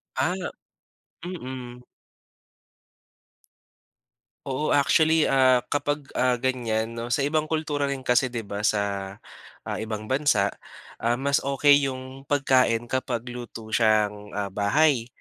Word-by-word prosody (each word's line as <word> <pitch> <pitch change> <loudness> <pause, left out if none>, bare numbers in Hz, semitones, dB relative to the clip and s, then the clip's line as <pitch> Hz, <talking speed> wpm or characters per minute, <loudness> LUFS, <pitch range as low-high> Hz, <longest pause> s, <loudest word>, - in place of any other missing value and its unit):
Ah, 180 - +1 0.9
mm. 130 -8 -7 2.6
Oo 135 +3 0
actually, 155 +2 +4
ah, 130 -2 +4
kapag, 145 0 -1 0.2
ah, 125 -1 +3
ganyan 115 -3 -1
'no 115 0 -5
sa 120 +3 0
ibang 155 +1 0
kultura 150 -3 -1
rin 135 -1 -4
kasi, 125 +1 +3
di 120 -2 -5
ba? 100 0 -6
Sa, 100 -2 -1 0.5
ah, - - -4
ibang 110 -1 -4
bansa, 130 -8 +2 0.5
um, 120 +1 +1
mas 140 +2 +1
okey 140 +1 +3
yung 130 +1 -8
pagkain 130 -5 +2
kapag 125 -2 -1
luto 115 -2 -8
siyang, 105 -2 +1
ah, 100 -2 -3
bahay, 120 +5 +2
125 Hz, 120 wpm, -25 LUFS, 110-140 Hz, 2.6 s, actually